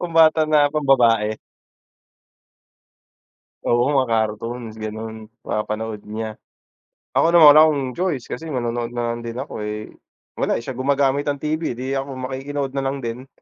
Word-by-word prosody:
pambata 165 -2 +4
na 150 -1 +4
pambabae. 115 -7 +3 2.3
Oo, 120 0 +3
mga 135 -3 +2
cartoons 110 +1 -2
gano'n, 110 +1 -6 0.3
mapanood 105 0 -3
niya. 110 0 -5 0.7
Ako - - +3
naman, 170 -2 +8
wala 155 - +8
akong 145 -3 0
choice, 170 -6 -2
kasi 160 +6 -5
manonood 120 -4 -2
na 120 -1 -1
lang 120 - -5
din 115 0 -6
ako, 130 -3 -5
eh, 105 0 -5 0.5
wala, - - +1
eh, - - -4
siya 130 - -4
gumagamit 140 +1 +1
ng 145 - 0
TV, 155 -4 -2
'di 130 +2 -4
ako 135 0 -5
makikinood 135 +2 -4
na 135 - -1
lang 135 +1 -1
din. 120 +3 -5
130 Hz, 150 wpm, -21 LUFS, 115-145 Hz, 2.3 s, naman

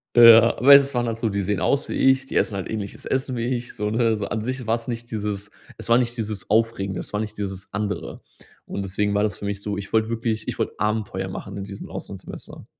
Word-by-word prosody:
Ja, 115 -1 +8
aber 140 +4 +8
es 140 0 +5
waren 120 -1 0
halt 115 -1 -3
so, 115 - 0
die 100 0 -2
sehen 100 +1 -1
aus 140 +1 +1
wie - - -2
ich, 135 0 +3
die - - -8
essen 105 - +2
halt 95 - -4
ähnliches 105 -3 -5
Essen 130 -1 -1
wie 120 +2 0
ich, 120 0 -6
so 105 0 -1
ne? 115 0 +2
So 105 - -3
an 105 0 -3
sich 130 0 -4
war 115 - +3
es 115 +1 -8
nicht 120 0 -5
dieses 105 -1 -3 0.3
es - - -9
war 115 - +6
nicht 120 -1 0
dieses 105 -4 -4
Aufregende, 105 -4 +1
es - - -8
war 105 - 0
nicht 105 -1 -6
dieses 95 -1 -5
Andere. 105 0 -4 0.4
Und 100 - -4
deswegen 100 +2 -1
war 105 +1 +2
das 105 - -1
für - - -7
mich 100 0 -3
so 105 -1 -3
ich 100 -1 -7
wollte 110 0 +2
wirklich 115 -1 -2
ich - - -5
wollte - - -1
Abenteuer 105 0 -1
machen - - -7
in 100 - -4
diesem 100 0 -8
Auslandssemester. - - -9
110 Hz, 255 wpm, -23 LUFS, 100-120 Hz, 0.4 s, Ja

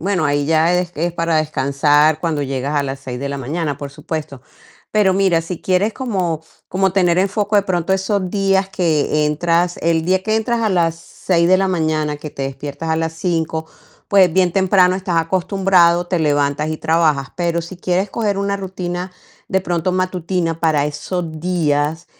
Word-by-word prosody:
Bueno, 185 -2 0
ahí 145 0 +1
ya 165 +2 +3
es, 180 -1 -1
es 170 +3 -1
para 165 -1 0
descansar 150 0 +2
cuando 155 -4 -1
llegas 135 +2 -3
a 145 - +2
las 135 0 -5
6:00 130 -2 -6
de 140 - -3
la 140 0 -4
mañana, 145 +2 -3
por 145 0 -7
supuesto. 140 -2 -6 0.5
Pero 205 -3 +3
mira, 190 -3 +2
si 165 +1 -6
quieres 190 +4 +1
como 185 - -2 0.3
como 190 0 +1
tener 180 -3 +2
en 195 +1 +3
foco 205 +1 0
de 200 - +4
pronto 185 -1 -1
esos 190 -1 0
días 195 -1 +1
que 155 -4 +1
entras, 170 +3 +1
el 165 -1 +1
día 185 +1 +1
que 215 +2 0
entras 230 +1 0
a 220 - +2
las 170 -4 +1
6:00 170 +1 -1
de 185 - +6
la 190 0 +1
mañana, 155 -4 0
que 150 +1 -8
te 140 - -6
despiertas 140 +3 -5
a 160 - +2
las 160 0 -1
5:00 160 -2 -2 0.4
pues, 190 -4 +5
bien 185 -1 +2
temprano 185 -1 +3
estás 185 -2 -2
acostumbrado, 175 0 +2
te 180 -1 0
levantas 145 0 +1
y 155 - -2
trabajas. 155 -5 +1
Pero 170 -1 0
si 170 +2 -9
quieres 185 +2 -1
coger 205 -3 -1
una 200 0 -1
rutina, 185 -1 -5 0.4
de 190 - +1
pronto 175 -1 -1
matutina, 180 -2 -1
para 155 -3 +2
esos 160 +2 -4
días 160 -2 0
170 Hz, 185 wpm, -18 LUFS, 155-185 Hz, 0.5 s, de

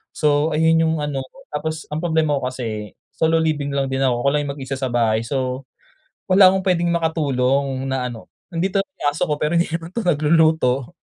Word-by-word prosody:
So 150 0 +2
ayun 160 +1 +3
yung 160 - +1
ano 145 -2 -2
ko, 130 - -22
tapos 160 +2 -3
ang 150 - -2
problema 160 -4 +1
ko 130 - -4
kasi 110 -5 -5 0.2
solo 160 0 +1
living 145 -3 -1
lang 135 -1 0
din 135 0 -1
ako, 125 -2 +2
ako - - +1
lang 150 - +1
yung 140 - -3
mag-isa 135 -1 -5
sa 130 -2 -1
bahay. 115 -2 +1
So, 130 +1 -2 0.7
wala 185 0 +7
akong 190 - 0
puwedeng 175 -2 +1
makatulong 140 -5 0
na 130 -1 -1
ano 115 -2 -10 0.2
nandito 190 +4 0
ang 150 - -2
aso 160 - -1
ko 150 - 0
pero 150 +2 0
hindi 170 - +2
naman 165 +1 -4
to 235 - -2
nagluluto. 155 -3 +2
150 Hz, 200 wpm, -21 LUFS, 130-165 Hz, 0.7 s, wala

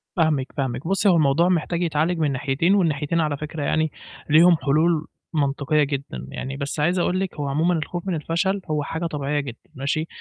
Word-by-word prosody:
فاهمِك، 155 -7 +1
فاهمِك، 130 +1 -2
بُصّي 195 +2 +3
هو 180 - +5
الموضوع 155 +2 +3
محتاج 170 0 0
يتعالج 165 +1 0
من 150 -3 +1
ناحيتين 140 +8 +1
والناحيتين 165 -3 +1
على 150 -2 -1
فكرة 150 +1 -5
يعني 155 +2 +1 0.4
ليهم 165 +3 +6
حلول 155 +2 +1 0.3
منطقية 145 0 +1
جدًا، 140 -1 -4
يعني 135 +1 -5
بس 140 +1 -4
عايز 175 +5 +2
أقول 180 +1 +1
لِك 190 -1 -3
هو 145 -1 -3
عمومًا 160 +6 +1
الخوف 175 +3 -3
من 185 - 0
الفشل 170 +6 -1
هو 150 -1 0
حاجة 160 +4 -4
طبيعية 150 -2 -1
جدًا 135 -5 -8
ماشي، 145 +4 -1
155 Hz, 190 wpm, -23 LUFS, 140-170 Hz, 0.4 s, ليهم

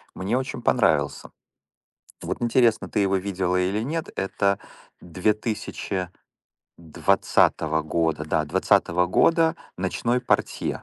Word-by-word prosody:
мне 100 +7 -1
очень 130 -2 -4
понравился. 80 - +1 0.9
Вот - - -4
интересно, 120 -1 +2
ты 105 - 0
его 95 -1 +2
видела 95 -1 -1
или 95 +3 0
нет. 160 +5 -3
Это 100 0 0 0.4
2020 90 -5 -2
года, 80 0 -1
да, - - 0
20 90 +1 +2
года, 165 - +3 0.2
"Ночной 115 +6 -1
портье". 125 - -1
95 Hz, 100 wpm, -24 LUFS, 90-120 Hz, 0.9 s, года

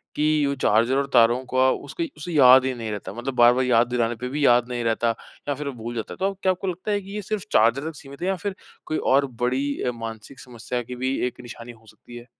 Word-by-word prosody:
कि 150 0 +2
वो 140 - 0
चार्जर 115 +5 +3
और 140 0 0
तारों 120 +1 +4
को 130 - -4
अ, 130 0 +5
उसके 165 +4 -4
उसे 155 +4 -6
याद 130 -3 +7
ही 130 - 0
नहीं 115 -2 -5
रहता, 105 -1 -6
मतलब 125 +3 -5
बार-बार 120 +1 +5
याद 120 -1 +3
दिलाने 120 -1 0
पर 125 - -2
भी 145 +2 -1
याद 120 -1 +4
नहीं 120 -1 -3
रहता 115 +1 +1 0.4
या - - +2
फिर 145 +1 -6
वो 140 - -3
भूल 120 +1 -5
जाता 115 - -5
है। - - -12
तो 195 +1 0
क्या 190 - +3
आपको 185 +1 -4
लगता 185 +3 -3
है 205 0 0
कि 195 +1 -10
यह 210 - -3
सिर्फ़ 205 -1 -3
चार्जर 120 +8 +3
तक 160 - -11
सीमित 140 0 -12
है। 180 - -1
या 195 - +1
फिर 190 +2 -5 0.3
कोई 155 - -2 0.2
और 140 +1 +4 0.2
बड़ी 130 +3 0
अ, 125 - 0
मानसिक 115 +2 -8
समस्या 125 -2 -5
की 125 +2 -8
भी 130 +2 -2
एक 125 - -9
निशानी 120 0 -10
हो 115 -1 -19
सकती 120 +3 -14
है? 120 - -11
130 Hz, 265 wpm, -23 LUFS, 120-150 Hz, 0.4 s, याद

